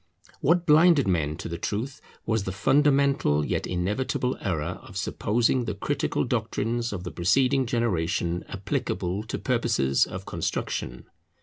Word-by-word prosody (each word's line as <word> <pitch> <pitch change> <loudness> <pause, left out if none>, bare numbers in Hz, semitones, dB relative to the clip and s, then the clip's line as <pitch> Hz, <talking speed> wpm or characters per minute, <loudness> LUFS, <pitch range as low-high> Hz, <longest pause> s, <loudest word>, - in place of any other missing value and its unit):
What 170 +4 +2
blinded 160 - +5
men 80 -5 0
to - - -6
the 85 +1 -5
truth 115 +9 -3 0.2
was 110 -3 0
the 95 - -2
fundamental 135 - +3
yet - - -2
inevitable 105 +8 -1
error 85 -3 -2
of 115 -6 -10
supposing 120 +5 +1
the 105 -3 -3
critical - - -1
doctrines 115 +2 -1
of 95 -3 -5
the 90 - -5
preceding 130 +8 +2
generation 90 -7 0
applicable 95 0 -2
to 115 - -4
purposes 115 - +1
of - - -7
construction. - - -3
105 Hz, 135 wpm, -26 LUFS, 90-130 Hz, 0.2 s, blinded